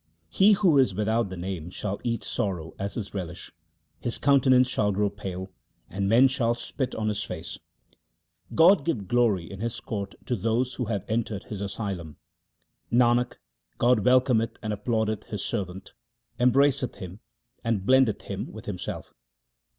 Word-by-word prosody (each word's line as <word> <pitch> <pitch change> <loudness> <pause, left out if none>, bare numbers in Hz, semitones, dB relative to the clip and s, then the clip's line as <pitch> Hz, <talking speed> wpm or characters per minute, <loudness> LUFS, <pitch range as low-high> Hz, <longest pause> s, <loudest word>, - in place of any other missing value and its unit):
He 200 - +5
who 185 -8 +4
is 105 -8 +3
without 110 +1 +1
the 95 - -7
Name 90 -2 -5
shall 100 +2 -4
eat 115 -1 -1
sorrow 90 -8 -3
as 100 +1 -3
his 105 -4 -5
relish; 90 -3 -6 0.5
his 120 - -2
countenance 130 -2 +4
shall 105 -5 +1
grow 100 +1 +1
pale, 95 -2 -6 0.4
and 100 +1 -1
men 120 +5 +7
shall 120 -3 +1
spit 125 +2 -4
on 110 -1 -2
his 105 -1 -1
face. - - -6 1.0
God 180 +5 +7
will - - -14
give 125 - -2
glory 115 -7 +2
in 95 - -8
His 115 +2 -3
court 100 -4 -5
to 125 - 0
those 115 +5 0
who 125 - -3
have 105 -3 -3
entered 110 -2 -2
His 105 -2 -7
asylum. 100 -6 -5 0.7
Nanak, 120 0 +3 0.4
God 120 0 +4
welcometh 125 -2 +3
and 110 -1 -1
applaudeth 110 0 -1
His 105 - -5
servant, 95 -4 -4 0.5
embraceth 125 +1 +3
him 95 +2 -9 0.4
and 115 -5 -1
blendeth 130 -3 +4
him - - -5
with - - -10
Himself. - - -6
110 Hz, 160 wpm, -26 LUFS, 100-125 Hz, 1.0 s, men